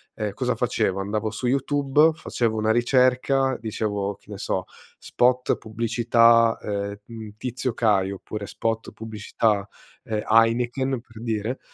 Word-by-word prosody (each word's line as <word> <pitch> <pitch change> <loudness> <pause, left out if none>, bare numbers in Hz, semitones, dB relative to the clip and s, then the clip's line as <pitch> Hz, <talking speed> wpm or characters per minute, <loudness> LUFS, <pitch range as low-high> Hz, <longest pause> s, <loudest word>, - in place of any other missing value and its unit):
ehm, 105 -2 -3
cosa - - -1
facevo: 95 0 0
andavo 105 +2 -2
su 115 +4 -5
YouTube, 140 +4 +3
facevo 115 -7 -1
una 110 0 +2
ricerca, 130 +2 +2
dicevo 105 -2 -2
che 105 - -17
ne 100 - -6
so: 95 - -1 0.3
"Spot 125 +1 +1
pubblicità, 115 +1 +3
ehm, 100 0 -3
mhmm, 110 -2 -9
Tizio 125 0 -3
Caio." 100 -4 +2
Oppure: 100 +1 -7
"Spot 115 0 -3
pubblicità, 105 -1 -1 0.4
ehm, 110 -1 -2
Heineken." 120 +3 +2
Per 115 -2 -14
dire. 115 +2 -2
115 Hz, 135 wpm, -24 LUFS, 105-125 Hz, 0.4 s, YouTube